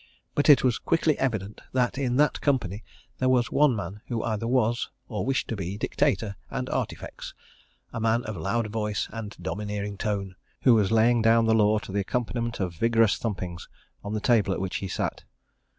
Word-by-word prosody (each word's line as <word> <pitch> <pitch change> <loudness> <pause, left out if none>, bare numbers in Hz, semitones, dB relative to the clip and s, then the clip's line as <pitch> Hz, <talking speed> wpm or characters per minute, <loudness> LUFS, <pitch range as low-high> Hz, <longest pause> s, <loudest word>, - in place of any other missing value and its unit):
But 145 - +2
it 145 -4 +8
was 125 -3 +2
quickly 160 -2 +2
evident 105 -6 -2
that 125 -2 +1
in 125 -3 0
that 150 +2 +2
company 110 - 0 0.4
there 130 - +2
was 125 -2 +2
one 145 -4 +4
man 100 0 -5
who 115 -3 -2
either 115 0 -2
was, 120 -1 +1 0.2
or 110 - -3
wished 135 0 0
to 115 - -1
be 95 0 -4
dictator 115 -4 0
and - - -3
artifex - - -4 0.6
a - - -3
man 115 +2 +2
of 110 - -5
loud 115 +8 -1
voice 105 -1 -2
and 110 -2 -7
domineering 105 +2 -4
tone, 100 -4 -2 0.3
who 125 - +7
was 105 -3 +3
laying 115 +1 +4
down 115 +1 +4
the 110 - +3
law 110 -1 +4
to 105 -2 -6
the 100 - 0
accompaniment 120 +3 -2
of 90 -3 -2
vigorous 115 +4 +3
thumpings 90 -6 -4 0.4
of 105 +1 -3
the 105 - -2
table 110 -5 +3
at - - -4
which 95 0 -2
he 95 - -4
sat. 95 - -3
110 Hz, 190 wpm, -26 LUFS, 100-120 Hz, 0.6 s, it